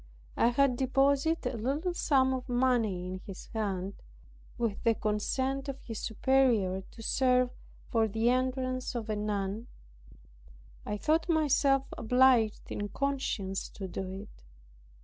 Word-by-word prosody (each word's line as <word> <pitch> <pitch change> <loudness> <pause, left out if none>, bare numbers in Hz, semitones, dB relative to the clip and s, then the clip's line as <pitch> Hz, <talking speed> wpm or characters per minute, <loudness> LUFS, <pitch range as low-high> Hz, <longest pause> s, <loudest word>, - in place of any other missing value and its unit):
I - - +3
had 250 +1 +3
deposited 275 +5 +2
a - - -4
little 285 - -1
sum 265 -6 +2
of 255 -1 -4
money 240 -7 +1
in 185 +1 -5
his 195 -2 -8
hands 200 -3 -2 0.6
(with 230 -4 -1
the 230 -1 +3
consent 260 +7 -1
of 275 - -5
his 225 -2 -6
superior) 225 -6 +2
to 225 +4 -13
serve 250 0 +2 0.4
for 225 -1 +3
the 225 +3 +1
entrance 255 0 -1
of 225 -2 -3
a - - 0
nun. 210 +1 -2 1.2
I 210 - -2
thought 320 - +1
myself 280 -4 +3 0.2
obliged 245 -2 +3
in 205 0 -3
conscience 260 -9 -2
to 195 - -7
do 185 +1 -5
it. 195 - -10
245 Hz, 135 wpm, -30 LUFS, 210-265 Hz, 1.2 s, I